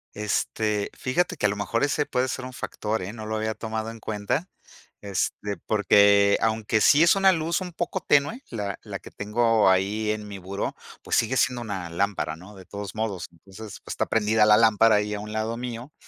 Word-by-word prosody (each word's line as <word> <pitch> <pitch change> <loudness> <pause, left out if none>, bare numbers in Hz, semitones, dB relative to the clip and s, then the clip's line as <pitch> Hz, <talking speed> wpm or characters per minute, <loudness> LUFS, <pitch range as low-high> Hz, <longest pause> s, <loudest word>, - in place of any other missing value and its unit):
Este, 105 0 -1
fíjate 175 +6 -1
que 105 - +2
a - - 0
lo 100 - -2
mejor 105 +4 -1
ese 145 +1 +1
puede 130 0 0
ser 125 0 -4
un 130 - -8
factor, 110 -2 -3
¿eh? 95 +4 -6
No 110 -2 -8
lo 110 0 -3
había 110 0 -2
tomado 110 0 -4
en 115 0 -9
cuenta. 105 - -2 0.5
Este, 100 +1 -2
porque 100 -1 +5
aunque 110 -1 +1
sí 150 +3 +6
es 170 - +5
una 195 -1 +5
luz 165 +2 -1
un 180 -2 -6
poco 175 - -2
tenue, 145 - +2
la 100 -4 -4
la - - -6
que - - -14
tengo 110 0 +2
ahí 100 +3 +1
en 105 -1 -2
mi 100 -1 -8
buró, 95 +2 -4 0.3
pues - - -1
sigue 120 +3 +1
siendo 125 -2 +1
una 95 -6 -5
lámpara, 90 -3 -1
¿no?, 95 +5 -14
de 95 - -13
todos 100 +1 -7
modos. 110 -5 -3
Entonces, 100 +5 -12
pues - - -6
está - - -1
prendida 110 0 +3
la 105 0 +7
lámpara 110 -1 +5
ahí 105 0 0
a 105 - -3
un 105 +1 -7
lado 110 +2 -2
mío. 125 +3 -6
110 Hz, 210 wpm, -25 LUFS, 100-120 Hz, 0.5 s, la